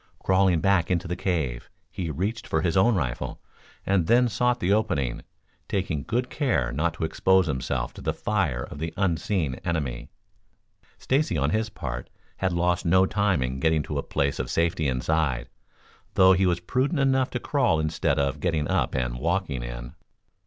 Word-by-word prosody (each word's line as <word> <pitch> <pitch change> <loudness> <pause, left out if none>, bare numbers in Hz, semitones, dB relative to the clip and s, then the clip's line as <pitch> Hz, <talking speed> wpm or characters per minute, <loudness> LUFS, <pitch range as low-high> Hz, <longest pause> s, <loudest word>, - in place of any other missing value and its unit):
Crawling 95 -3 +3
back 95 -2 +2
into 90 -1 0
the 90 - -2
cave, 80 -10 -2 0.2
he 90 -3 -4
reached 100 +9 -3
for 80 0 0
his 85 -2 +1
own 105 +5 +4
rifle 65 -9 -3 0.5
and 95 -4 +2
then 120 +2 +5
sought 125 +3 +1
the 100 -2 +2
opening, 90 - 0 0.5
taking 90 -7 -1
good 125 - -1
care 95 - 0
not 80 +6 -1
to - - -5
expose 95 +3 +3
himself 65 -4 -2
to - - -10
the - - 0
fire 85 - -1
of - - -9
the 80 +1 -4
unseen 85 -6 0
enemy. 70 -8 -3 0.9
Stacy, 135 - 0
on 70 +1 +1
his 110 +2 0
part, 65 - -6 0.3
had 95 -1 0
lost 85 0 +1
no 95 +2 +4
time 100 -7 +1
in 65 +1 -3
getting 80 0 +2
to - - -3
a - - 0
place 70 0 -1
of - - -3
safety 85 -2 +1
inside, 65 -1 0 0.7
though 95 0 +7
he 95 +1 +3
was 85 -1 0
prudent 130 - 0
enough 135 -1 +2
to 120 - -3
crawl 125 - +1
instead 75 -2 0
of 70 -1 0
getting 80 -4 0
up - - 0
and 60 -2 -2
walking 85 -4 -1
in. - - -7
85 Hz, 175 wpm, -26 LUFS, 70-100 Hz, 0.9 s, though